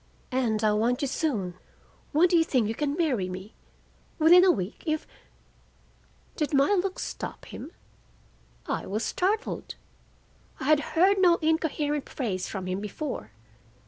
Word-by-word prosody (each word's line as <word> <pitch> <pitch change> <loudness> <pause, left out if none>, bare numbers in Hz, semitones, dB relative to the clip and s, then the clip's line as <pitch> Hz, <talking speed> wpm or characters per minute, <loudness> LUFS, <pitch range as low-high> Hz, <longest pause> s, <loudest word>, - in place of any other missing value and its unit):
And 230 -4 0
I 215 - +4
want 235 +5 +1
you - - +1
soon. 235 - -1 0.6
When 320 +4 +5
do 350 - +2
you 330 - +5
think 255 -9 +1
you 220 - -1
can 290 +3 -1
marry 255 - 0
me? 185 +4 -8 0.6
Within 345 +3 +7
a 380 - +6
week—if—" 310 - -1 1.3
Did 300 -2 -1
my 275 +7 +4
look 380 -1 0
stop - - -6
him? 315 - -9 0.9
I - - -3
was 215 +4 -2
startled. 420 +6 -1 0.8
I - - -6
had 300 +2 +4 0.2
heard 385 +3 +5
no 355 -2 +6
incoherent 310 -2 0
phrase 195 -9 -3
from 190 -2 -5
him 185 +1 -2
before. 210 - -5
285 Hz, 145 wpm, -27 LUFS, 215-325 Hz, 1.3 s, Within